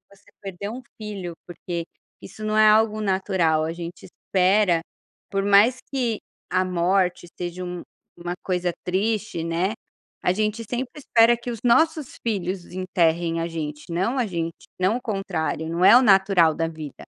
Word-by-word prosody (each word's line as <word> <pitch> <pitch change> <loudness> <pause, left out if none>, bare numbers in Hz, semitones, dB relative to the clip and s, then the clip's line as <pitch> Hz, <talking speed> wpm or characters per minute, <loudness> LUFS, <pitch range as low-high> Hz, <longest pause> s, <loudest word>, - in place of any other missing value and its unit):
você - - -24
perder 195 0 -6
um 245 +4 -6 0.2
filho, 195 -5 -5
porque 170 -1 -5 0.4
isso 215 - -10
não 215 - 0
é 215 0 +7
algo 215 0 +3
natural. 190 -5 +1
A 165 - -3
gente 170 +1 -8
espera, 185 -1 +2 0.5
por 195 0 0
mais 205 +6 +5
que 245 -5 -1 0.3
a 185 - +2
morte 180 0 +1
seja 175 +1 -5
um 180 -1 -5 0.4
uma 175 0 -3
coisa 180 -2 -1
triste, 200 -1 -1
né, 170 +5 0 0.5
a 180 - +3
gente 215 +3 -1
sempre 250 +1 -3
espera 235 -4 +4
que 240 +1 -6
os 230 - -6
nossos 310 +3 +2
filhos 185 -3 -2
enterrem 175 -2 0
a 165 - -1
gente, 150 -3 -5
não 190 +10 0
a 250 - +2
gente 170 -4 -3 0.3
não 190 +6 +2
o 250 - -9
contrário. 180 -7 -2
Não 170 +3 +1
é - - +9
o 255 - +5
natural 195 -7 +5
da 165 - 0
vida. 155 -3 -9
185 Hz, 165 wpm, -24 LUFS, 170-215 Hz, 0.5 s, é